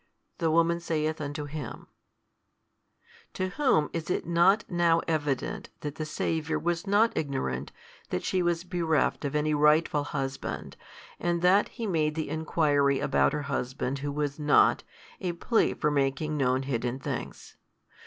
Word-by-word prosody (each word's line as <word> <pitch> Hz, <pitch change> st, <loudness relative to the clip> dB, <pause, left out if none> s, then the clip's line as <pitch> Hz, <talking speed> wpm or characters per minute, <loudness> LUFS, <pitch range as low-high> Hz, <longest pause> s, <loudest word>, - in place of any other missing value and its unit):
The 165 Hz, -2 st, +1 dB
woman 170 Hz, +1 st, +3 dB
saith 155 Hz, -2 st, -2 dB
unto 145 Hz, 0 st, -4 dB
Him, 145 Hz, -4 st, -7 dB, 1.5 s
To 185 Hz, 0 st, -1 dB
whom 190 Hz, -, +2 dB
is 165 Hz, 0 st, -4 dB
it -, -, -1 dB
not 175 Hz, +6 st, +4 dB
now 170 Hz, -2 st, +2 dB
evident 145 Hz, -5 st, -2 dB
that 145 Hz, -1 st, -4 dB
the 155 Hz, 0 st, -5 dB
Saviour 160 Hz, 0 st, -1 dB
was 175 Hz, +3 st, -2 dB
not 210 Hz, +3 st, +3 dB
ignorant 100 Hz, -, -2 dB, 0.4 s
that 90 Hz, -, -2 dB
she 185 Hz, -, 0 dB
was 175 Hz, -1 st, 0 dB
bereft 170 Hz, -5 st, 0 dB
of 140 Hz, -, -2 dB
any 150 Hz, 0 st, +1 dB
rightful 150 Hz, 0 st, +3 dB
husband 135 Hz, -2 st, -4 dB, 0.4 s
and 175 Hz, 0 st, -1 dB
that 190 Hz, +3 st, +5 dB
He 235 Hz, -, -6 dB
made 155 Hz, -6 st, 0 dB
the 160 Hz, -3 st, -3 dB
enquiry 145 Hz, -3 st, +2 dB
about -, -, +2 dB
her 150 Hz, -1 st, -2 dB
husband 135 Hz, -1 st, -3 dB
who 145 Hz, +1 st, -3 dB
was 145 Hz, 0 st, -2 dB
not, 150 Hz, -1 st, +4 dB, 0.4 s
a 180 Hz, -2 st, -2 dB
plea 225 Hz, +7 st, +1 dB
for 150 Hz, -, 0 dB
making 140 Hz, +2 st, 0 dB
known 130 Hz, -2 st, +1 dB
hidden 125 Hz, -1 st, -2 dB
things? 135 Hz, -, -6 dB
155 Hz, 150 wpm, -28 LUFS, 140-170 Hz, 1.5 s, that